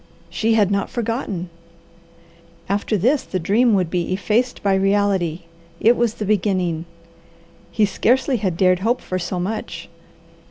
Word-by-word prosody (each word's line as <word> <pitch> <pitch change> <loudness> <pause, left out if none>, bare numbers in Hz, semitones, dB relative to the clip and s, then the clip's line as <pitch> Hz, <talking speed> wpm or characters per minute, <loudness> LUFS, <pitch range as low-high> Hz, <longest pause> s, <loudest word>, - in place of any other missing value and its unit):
She 225 0 +1
had 205 -3 +3
not 200 0 0
forgotten! 225 -7 -3 1.2
After 205 +2 0
this, 255 - +2
the 185 - -4
dream 210 +6 +3
would 180 -4 0
be 175 -1 -1
effaced 225 +6 0
by 200 -1 +2
reality. 195 -3 +1 0.4
It 235 +2 +5
was 235 -2 0
the 210 - -4
beginning. 185 -5 0 0.8
He 215 - +2
scarcely 255 +6 +1
had 190 -6 -2
dared 185 -1 +3
hope 230 +6 0
for 185 - -3
so 180 +1 -3
much. 210 +5 -5
200 Hz, 145 wpm, -21 LUFS, 185-225 Hz, 1.2 s, It